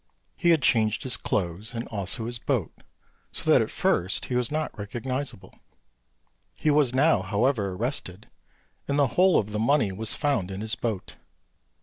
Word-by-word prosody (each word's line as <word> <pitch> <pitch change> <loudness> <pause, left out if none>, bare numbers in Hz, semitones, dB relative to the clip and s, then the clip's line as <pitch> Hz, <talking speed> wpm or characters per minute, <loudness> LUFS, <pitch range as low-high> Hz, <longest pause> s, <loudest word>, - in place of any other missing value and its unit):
He 175 - +1
had 160 -5 +4
changed 110 -3 +3
his 130 - -2
clothes 100 +4 -3
and 115 - -3
also 105 +2 -2
his 120 +1 -3
boat, - - -1 0.6
so - - -6
that - - +6
at - - -1
first 90 +3 0
he 125 - -3
was 125 -1 +2
not 155 +1 -2
recognisable; 125 +3 -5 1.0
he 155 - +1
was 145 -4 +4
now, 140 - +4
however, 100 +1 0
arrested, 105 -3 -4 0.6
and 140 - 0
the 145 - +5
whole 185 0 +5
of 105 0 -1
the 105 - -2
money 115 -2 +2
was 110 +3 -4
found 140 -11 0
in 95 +1 -5
his 110 0 -2
boat. 115 -6 -4
115 Hz, 165 wpm, -26 LUFS, 100-140 Hz, 1.0 s, that